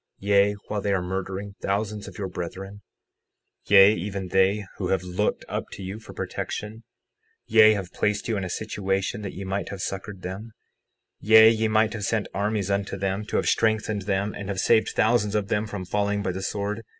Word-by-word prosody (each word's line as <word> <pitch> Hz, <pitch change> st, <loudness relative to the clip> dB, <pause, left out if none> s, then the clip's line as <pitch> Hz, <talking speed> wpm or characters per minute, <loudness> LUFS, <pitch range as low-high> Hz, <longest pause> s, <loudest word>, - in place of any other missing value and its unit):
Yea, 100 Hz, 0 st, +3 dB
while 105 Hz, -1 st, -2 dB
they 100 Hz, -, -1 dB
are 95 Hz, -, +2 dB
murdering 95 Hz, +2 st, -4 dB
thousands 105 Hz, +1 st, -2 dB
of 95 Hz, -, -10 dB
your 100 Hz, -, -3 dB
brethren— 95 Hz, +3 st, -7 dB, 0.9 s
60:8 -, -, -19 dB
Yea, 100 Hz, +1 st, +8 dB
even 95 Hz, 0 st, -4 dB
they 95 Hz, +3 st, +2 dB
who 95 Hz, -, -2 dB
have 95 Hz, -1 st, 0 dB
looked 90 Hz, +3 st, -1 dB
up -, -, -3 dB
to 95 Hz, -, -8 dB
you 95 Hz, +3 st, -6 dB
for 115 Hz, -, -12 dB
protection, 110 Hz, +2 st, -5 dB, 0.6 s
yea, 110 Hz, -1 st, +6 dB
have 95 Hz, -3 st, -5 dB
placed 105 Hz, -1 st, -1 dB
you 115 Hz, -, 0 dB
in 100 Hz, -, -2 dB
a 90 Hz, -, -4 dB
situation 95 Hz, +3 st, -2 dB
that 100 Hz, -2 st, -5 dB
ye 100 Hz, -, -6 dB
might 95 Hz, +1 st, -3 dB
have 100 Hz, -, -6 dB
succored 95 Hz, +1 st, -5 dB
them, 100 Hz, +5 st, -6 dB, 0.7 s
yea, 110 Hz, +1 st, +8 dB
ye 110 Hz, 0 st, +1 dB
might 110 Hz, 0 st, +2 dB
have 110 Hz, -2 st, -5 dB
sent 110 Hz, +1 st, 0 dB
armies 100 Hz, 0 st, -1 dB
unto 100 Hz, 0 st, -1 dB
them, 95 Hz, +1 st, -2 dB
to -, -, -6 dB
have -, -, +1 dB
strengthened 110 Hz, -2 st, +1 dB
them, 100 Hz, +1 st, 0 dB
and 100 Hz, -1 st, -7 dB
have 95 Hz, -2 st, -2 dB
saved 110 Hz, +1 st, +3 dB
thousands 110 Hz, -2 st, +2 dB
of 105 Hz, -2 st, -1 dB
them 105 Hz, 0 st, 0 dB
from 100 Hz, -3 st, -6 dB
falling 100 Hz, +2 st, 0 dB
by 95 Hz, -, -1 dB
the 95 Hz, +1 st, -5 dB
sword. 100 Hz, +3 st, -3 dB
100 Hz, 200 wpm, -25 LUFS, 95-105 Hz, 0.9 s, Yea